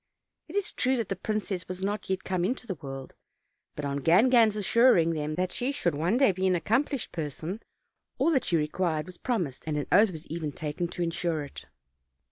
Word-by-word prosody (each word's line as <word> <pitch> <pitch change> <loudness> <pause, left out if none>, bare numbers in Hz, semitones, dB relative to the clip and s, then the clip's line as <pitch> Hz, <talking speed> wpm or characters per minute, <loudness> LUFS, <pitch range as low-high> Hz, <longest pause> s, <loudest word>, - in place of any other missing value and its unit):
It 320 - -10
is 405 -2 0
true 260 +1 +1
that 230 -4 -2
the 195 - -1
princess 195 -2 -3
was 185 +1 -5
not 205 0 -2
yet 190 0 -1
come 185 -2 -1
into 245 +6 -1
the 205 - -3
world; 135 -4 -8 0.6
but, 150 - -4
on 140 0 -1
Gangan's 215 - +5
assur 230 +4 +5
ing 165 0 +3
them 155 -1 -2
that 180 +1 -1
she 250 +3 -1
should 180 - 0
one 170 +10 +1
day 270 -5 +5
be 190 +1 0
an 185 - +3
accomplished 240 - 0
person, 160 - -5 0.6
all 335 - +3
that 270 -5 +2
she 170 - +2
required 155 0 -1
was 180 0 -11
promised, 175 - -2
and 150 -1 -1
an 145 - -1
oath 205 +4 +6
was 160 -2 -8
even 155 -2 -4
taken 155 +2 -3
to 175 +1 -3
insure 165 -2 -1
it. 140 - -10
180 Hz, 210 wpm, -28 LUFS, 155-215 Hz, 0.6 s, oath